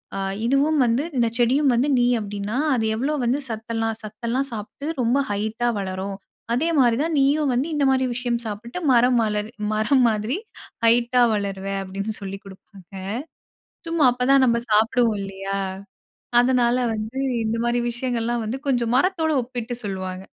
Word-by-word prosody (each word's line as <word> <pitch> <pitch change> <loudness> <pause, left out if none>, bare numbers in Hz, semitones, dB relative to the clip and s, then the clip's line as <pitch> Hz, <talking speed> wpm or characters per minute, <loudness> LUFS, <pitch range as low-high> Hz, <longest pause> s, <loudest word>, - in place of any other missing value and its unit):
அ 195 - -2 0.3
இதுவும் 285 +4 +2
வந்து 235 +4 +1
இந்தச் 235 -1 +1
செடியும் 260 +3 +3
வந்து 250 +5 +2
நீ 245 - +3
அப்டின்னா, 205 +2 -4 0.2
அது 225 -2 0
எவ்ளோ 275 +7 -1
வந்து 250 +4 +1
சத்தெல்லாம், 225 0 -2
சத்தெல்லாம் 235 +6 -3
சாப்ட்டு 225 +7 -7
ரொம்ப 240 +3 +2
ஹைட்டா 220 +4 -1
வளரும். 190 0 -4 0.4
அதே 310 +8 +1
மாரி 240 -3 +4
தான் 325 0 -1
நீயும் 285 +1 +3
வந்து 255 +5 0
இந்த 290 - +1
மாரி 260 -1 +2
விஷயம் 240 -1 -1
சாப்பிட்டு 225 - -5
மரம் 245 0 +4
மலர் 210 0 -1 0.2
மரம் 250 +5 +3
மாதிரி, 215 - -1 0.5
ஹைட்டா 240 +2 +4
வளருவ." 195 -1 -3 0.2
அப்டின்னு 195 +3 -4
சொல்லி 195 0 -6
குடுப்பாங்க. 195 0 -15 1.0
சும்மா 330 -5 +3
அப்பதான் 260 +2 +3
நம்ம 235 -1 +3
சாப்டுவோம் 220 0 +3
இல்லையா? 195 0 -4 0.8
அதனால 245 -1 +3 0.2
வந்து 220 +5 -5 0.3
இந்த 220 +1 -1
மாரி 240 0 +1
விஷயங்கள்லாம் 240 -1 -2
வந்து 240 +5 -2
கொஞ்சம் 240 -3 +1
மரத்தோட 330 0 +1
ஒப்பிட்டு 245 -1 -5
சொல்வாங்க. 185 -1 -4
235 Hz, 145 wpm, -23 LUFS, 210-255 Hz, 1.0 s, மாரி